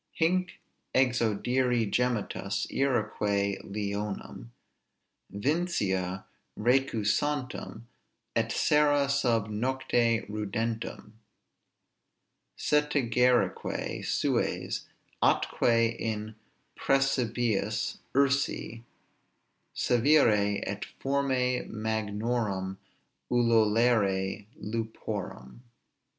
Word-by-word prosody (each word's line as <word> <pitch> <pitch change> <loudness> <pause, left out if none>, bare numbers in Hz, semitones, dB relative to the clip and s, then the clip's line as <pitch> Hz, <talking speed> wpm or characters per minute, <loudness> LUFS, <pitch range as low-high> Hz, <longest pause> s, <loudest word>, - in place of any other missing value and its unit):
Hinc 180 +2 0 0.4
exaudiri 120 -1 +2
gemitus, 115 -5 -1
iræque 105 -6 0
leonum 100 - -4 0.8
Vincia 100 - -1 0.3
recusantum, 125 +1 0 0.5
et - - +1
sera 145 -1 +3
sub 125 -6 +1
nocte 120 -1 +1
rudentum; 110 +1 -4 1.4
Setigerique 125 -5 +1
sues, - - -1 0.3
atque 115 -1 +2
in 110 -1 -3 0.4
præsepibus 120 -5 0 0.2
ursi 140 -4 +1 0.9
Sævire; 115 -6 +3
et 100 0 -4
formæ 130 -2 0
magnorum 105 -2 -2 0.5
ululare 110 -4 +2
luporam. 110 - -5
115 Hz, 55 wpm, -29 LUFS, 105-130 Hz, 1.4 s, sera